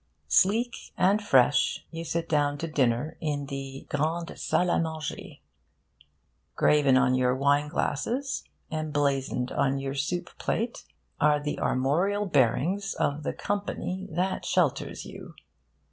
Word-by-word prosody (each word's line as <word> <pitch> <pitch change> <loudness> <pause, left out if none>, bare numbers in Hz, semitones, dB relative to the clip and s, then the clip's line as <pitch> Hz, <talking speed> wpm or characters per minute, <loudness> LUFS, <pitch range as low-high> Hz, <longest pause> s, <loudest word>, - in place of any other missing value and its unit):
Sleek 225 +5 +3 0.2
and 195 +3 +3
fresh, 135 -6 +3
you 165 0 -5
sit 165 0 -2
down 145 -2 +1
to 165 - -3
dinner 140 0 0
in 145 -2 -2
the 135 -1 -6
'Grande 160 +3 -1
Salle 180 0 +1
a' - - +2
Manger.' 160 -2 -4 1.2
Graven 145 -3 +4
on 130 -1 +3
your 125 0 +2
wine 140 +2 +2
glasses, 235 - -2 0.3
emblazoned 145 -5 -1
on 135 0 +1
your 135 0 -3
soup 175 +6 -2
plate, 230 +2 -2 0.3
are 150 0 +4
the 145 0 -3
armorial 175 +11 +1
bearings 170 - +1
of 145 +2 0
the - - -2
company 195 -2 -3
that 180 +4 -1
shelters - - 0
you. - - -10
150 Hz, 130 wpm, -27 LUFS, 140-180 Hz, 1.2 s, Graven